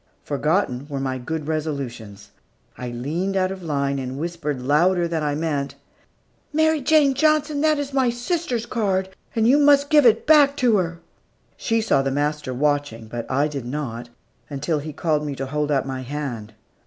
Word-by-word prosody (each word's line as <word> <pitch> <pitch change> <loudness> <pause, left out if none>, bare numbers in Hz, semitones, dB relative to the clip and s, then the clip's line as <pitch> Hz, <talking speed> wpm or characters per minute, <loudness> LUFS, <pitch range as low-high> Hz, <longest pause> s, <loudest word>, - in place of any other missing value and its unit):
Forgotten 145 -2 -1
were 140 -1 -3
my 130 -1 -2
good 155 +4 -4
resolutions. 120 -10 -4 0.4
I 125 - -6
leaned 160 +11 -2
out 185 0 +1
of 190 -1 -7
line, 140 -4 -1
and 130 0 -5
whispered 155 -3 -3
louder 170 +7 +2
than 165 -1 -2
I 145 -1 -1
meant, 145 -3 -2 0.8
"Mary 315 0 +2
Jane 290 -1 +4
Johnson, 300 +1 +2
that 310 0 +3
is 285 -1 -4
my 265 -2 +3
sister's 245 0 -2
card, 195 -6 -1 0.3
and 225 -1 +3
you 275 +4 +5
must 285 0 +4
give 295 -4 +7
it 225 - +3
back 290 -2 +5
to 240 -4 +3
her." 170 -2 -2 0.5
She 225 -1 0
saw 215 -10 +2
the 135 - -1
master 145 0 -1
watching, 140 -4 -1
but 120 0 -6
I 140 +3 +2
did 140 -5 -6
not, 120 -4 -5 0.4
until 150 +2 -1
he 155 +2 -6
called 150 0 0
me 145 -2 -4
to 135 - -4
hold 150 +2 -2
out 135 -3 +1
my 130 -1 -4
hand. 125 -6 -5
150 Hz, 180 wpm, -22 LUFS, 135-230 Hz, 0.8 s, give